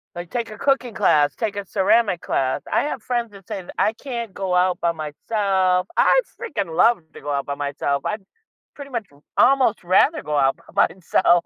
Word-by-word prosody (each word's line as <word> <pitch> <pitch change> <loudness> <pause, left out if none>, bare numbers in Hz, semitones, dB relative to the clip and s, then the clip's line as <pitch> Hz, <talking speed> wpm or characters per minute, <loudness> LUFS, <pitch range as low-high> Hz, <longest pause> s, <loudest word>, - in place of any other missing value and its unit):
Like, 175 0 -7
take 235 -3 -3
a 215 - -9
cooking 270 -4 +1
class, 145 -5 +3
take 215 -3 -2
a 200 -1 -4
ceramic 200 -1 +2
class. 130 -1 -1
I - - +3
have 280 -5 -3
friends 240 -2 -2
that 195 -2 -15
say 190 - -4
th 175 - -11
"I 220 - +3
can't 235 -4 -6
go 190 -2 -3
out 180 0 +2
by 170 - +1
myself." 185 +4 0
I - - +5 0.2
freaking 190 - -4
love 235 -5 +5
to - - -11
go 145 +1 -4
out 140 -1 -2
by 140 - -2
myself. 140 0 -2
I'd 210 -1 -2 0.5
pretty 280 -1 -10
much 225 -5 -3 0.3
almost 260 -6 +4
rather 275 - +3
go 150 -1 -2
out 135 -1 +2 0.2
by - - +4
myself. 175 -1 +2
195 Hz, 200 wpm, -22 LUFS, 170-235 Hz, 0.5 s, I